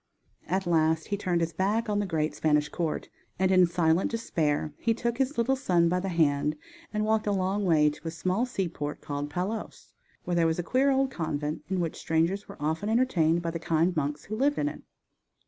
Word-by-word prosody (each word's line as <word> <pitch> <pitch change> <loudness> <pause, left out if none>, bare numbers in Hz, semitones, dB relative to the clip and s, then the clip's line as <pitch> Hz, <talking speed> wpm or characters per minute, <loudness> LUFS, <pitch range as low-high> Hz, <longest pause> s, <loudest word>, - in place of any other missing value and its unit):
At 190 +3 0
last 160 -1 +2
he 205 - +1
turned 180 -4 0
his 165 0 -1
back 210 +7 0
on 205 -1 0
the 205 - -1
great 155 -3 -1
Spanish 150 -1 +1
court, 165 -3 -3 0.3
and 190 +1 +2
in 185 -1 +6
silent 170 0 +2
despair 155 -10 -1
he 230 -1 +1
took 235 +1 -2
his 270 +2 0
little 240 +3 +2
son 175 -10 +2
by 180 +1 +1
the 195 +1 -3
hand 150 -3 +2 0.4
and 215 0 -1
walked 220 0 +1
a - - +2
long 195 +1 0
way 155 -4 +4
to 155 - -10
a - - 0
small 185 +8 -1
seaport 170 -10 -3
called 145 0 -4
Palos, 190 +7 -5 0.3
where 175 - -2
there 170 -1 +3
was 160 - 0
a 175 - -1
queer 260 +9 +2
old 270 -1 +2
convent 155 - -3
in 190 -1 0
which 165 -2 -2
strangers 170 +5 0
were - - -11
often 160 +7 -1
entertained 175 -9 +2
by 165 - -1
the 165 - -4
kind 165 +2 +1
monks 145 -1 -2
who 215 - -5
lived 280 +5 +1
in 295 - +1
it. - - -9
175 Hz, 215 wpm, -28 LUFS, 160-210 Hz, 0.4 s, in